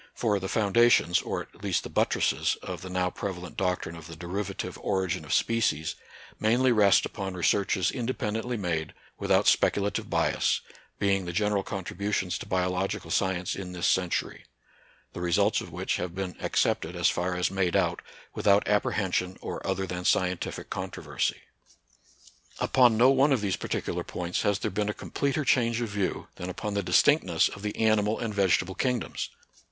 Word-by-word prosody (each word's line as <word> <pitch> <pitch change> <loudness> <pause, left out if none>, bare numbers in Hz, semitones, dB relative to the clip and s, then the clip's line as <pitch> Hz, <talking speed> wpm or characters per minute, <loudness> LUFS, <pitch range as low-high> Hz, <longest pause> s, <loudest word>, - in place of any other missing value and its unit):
For 105 -4 +1
the 95 0 -4
foundations, 110 -4 +4
or - - -3
at - - -20
least - - 0
the - - -7
buttresses, - - +1
of - - -6
the 95 - -7
now 90 0 0
prevalent 90 -3 -6
doctrine 90 -3 -1
of 80 -1 -10
the 80 - -9
derivative 90 +2 -4
origin 95 -5 -1
of 75 - -8
species 115 -9 +1 0.5
mainly 125 +4 +3
rest 100 -5 +5
upon 95 -3 -5
researches 95 0 +1
inde 125 0 -3
pendently 115 +1 -2
made, 85 -6 -2 0.2
without - - +2
speculative 100 0 +2
bias, - - +1 0.4
being 100 -2 +1
the 85 - -3
general 105 +2 +1
contributions 95 -1 -3
to - - -8
biological 90 +1 -1
science 90 -2 0
in 90 -2 -6
this 90 0 -2
century; 90 -2 0 0.7
the - - -6
results 85 -1 +2
of - - -9
which - - -2
have 90 -1 -4
been 95 -2 -4
accepted - - 0
as - - +2
far 90 +1 0
as 90 +1 0
made 95 -2 0
out - - +1 0.3
without 100 0 +3
apprehen 105 -2 +1
sion 90 0 -1
or - - -5
other 95 0 -1
than 90 -1 -5
scientific 90 0 0
controversy. - - -3 1.2
Upon 125 -4 +4
no 125 +4 +6
one 135 +2 +4
of 130 -5 +2
these 100 -2 0
particular - - -3
points 90 0 -3
has 105 -1 +2
there - - -3
been 105 +2 -1
a 105 - -2
completer 140 +1 -2
change 115 -3 +2
of 120 -2 -2
view 100 -2 -2
than 90 - -5
upon 105 +3 -4
the 100 - 0
distinctness - - +3
of 105 - -10
the 105 0 -4
animal 110 -1 +2
and 115 -2 -3
vege 100 -3 +4
table 95 +1 -7
kingdoms. 125 +3 -2
95 Hz, 170 wpm, -28 LUFS, 90-105 Hz, 1.2 s, no